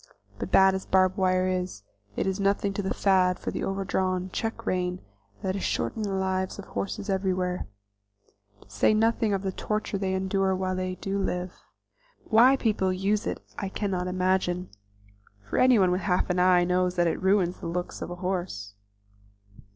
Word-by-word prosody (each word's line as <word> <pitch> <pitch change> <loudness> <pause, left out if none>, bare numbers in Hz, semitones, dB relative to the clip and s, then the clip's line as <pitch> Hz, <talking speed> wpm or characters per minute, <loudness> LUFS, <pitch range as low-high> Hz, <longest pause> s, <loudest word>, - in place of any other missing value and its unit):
But - - -4
bad 190 0 +6
as 190 - -4
barb 185 0 +3
wire 185 -2 +2
is, 180 - -3 0.3
it - - -1
is 190 +1 -1
nothing 200 0 +1
to 205 - -2
the 190 - -3
fad 185 -2 +3
for - - -4
the - - -4
over 195 0 -2
draw 185 -1 0
check 225 +3 -3
rein 180 0 -1 0.4
that 190 0 -1
is 195 - -3
shortening 215 -2 -1
the 195 - -2
lives 190 0 -1
of 200 - -8
horses 200 +1 -4
everywhere, 185 -2 -1 0.9
to - - -19
say 100 - +2
nothing 225 0 +2
of 195 -1 -1
the 190 - -1
torture 210 +1 -3
they 190 -1 -1
endure 190 0 +1
while 185 0 -1
they 185 0 -2
do 195 +1 -3
live. 180 -1 -2 0.7
Why 245 +4 +6
people 210 -7 +1
use 200 +4 0
it - - -4 0.2
I 195 - -3
cannot 190 -3 -2
imagine, 185 -1 0 0.8
for - - -1
anyone 225 -8 +5
with 180 +2 0
half 180 -1 +1
an 180 - 0
eye 180 -1 +5
knows 180 0 +1
that 175 -1 +2
it 165 - -1
ruins 190 -2 +2
the - - -5
looks 175 +1 -4
of - - -4
a 175 - -5
horse. 175 - -3
190 Hz, 180 wpm, -27 LUFS, 180-195 Hz, 0.9 s, bad